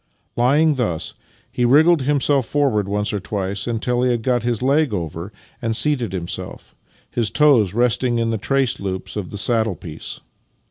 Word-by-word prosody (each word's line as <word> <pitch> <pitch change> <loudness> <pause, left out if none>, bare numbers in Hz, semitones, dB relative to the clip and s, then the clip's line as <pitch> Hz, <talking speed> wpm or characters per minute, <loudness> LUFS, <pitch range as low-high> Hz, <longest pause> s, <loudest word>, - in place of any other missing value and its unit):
Lying 145 +6 +3
thus, 85 -10 -2 0.4
he 125 - -1
wriggled 155 +6 +5
himself 140 -1 +1
forward 130 -9 +1
once 105 +1 -1
or 105 - -1
twice 100 +1 -3
until 120 +1 -1
he 125 - +2
had 120 -2 -1
got 125 -1 +1
his 120 0 -2
leg 140 -1 +2
over 85 +2 -5 0.3
and 115 -2 -1
seated 130 -5 +2
himself, 90 -3 -6 0.4
his 115 -3 0
toes 125 -11 +3
resting 120 0 +1
in 115 0 0
the 110 - -2
trace 135 +3 0
loops 95 -1 -5
of 100 -4 -4
the 105 - -7
saddle 110 -2 +1
piece. 80 -3 -7
120 Hz, 170 wpm, -20 LUFS, 100-130 Hz, 0.4 s, wriggled